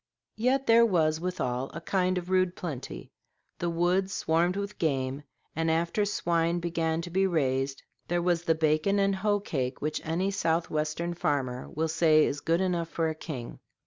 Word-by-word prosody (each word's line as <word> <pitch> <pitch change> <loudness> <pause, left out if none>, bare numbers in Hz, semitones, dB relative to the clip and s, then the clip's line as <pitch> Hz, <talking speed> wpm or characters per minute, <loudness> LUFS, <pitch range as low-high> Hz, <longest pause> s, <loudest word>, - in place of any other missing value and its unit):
Yet 260 +4 +1
there 230 -1 +6
was 160 -7 +2
withal 135 -8 -2
a - - -3
kind 185 +1 0
of 180 +1 -4
rude 185 -1 +2
plenty; 145 -7 -6 0.5
the 175 - -1
woods 180 +3 +1
swarmed 170 +3 +1
with 200 +1 -5
game, 135 -3 -1 0.3
and 165 +1 0
after 170 +6 +1
swine 170 -3 0
began 165 -1 -1
to 175 - -7
be 190 +2 +2
raised, 135 -5 0 0.2
there 175 - 0
was 175 -1 +2
the 165 - +3
bacon 155 +5 +2
and 195 -1 +2
hoe 205 +1 +1
cake 130 -9 -3
which 155 +1 -2
any 175 +5 0
south 170 -4 0
western 155 +3 -1
farmer 135 -6 -2
will 160 +2 -1
say 160 -1 +4
is 140 - -2
good 165 +2 +1
enough 175 -3 0
for 165 -1 0
a - - -2
king. 150 -6 -7
170 Hz, 175 wpm, -28 LUFS, 155-185 Hz, 0.5 s, there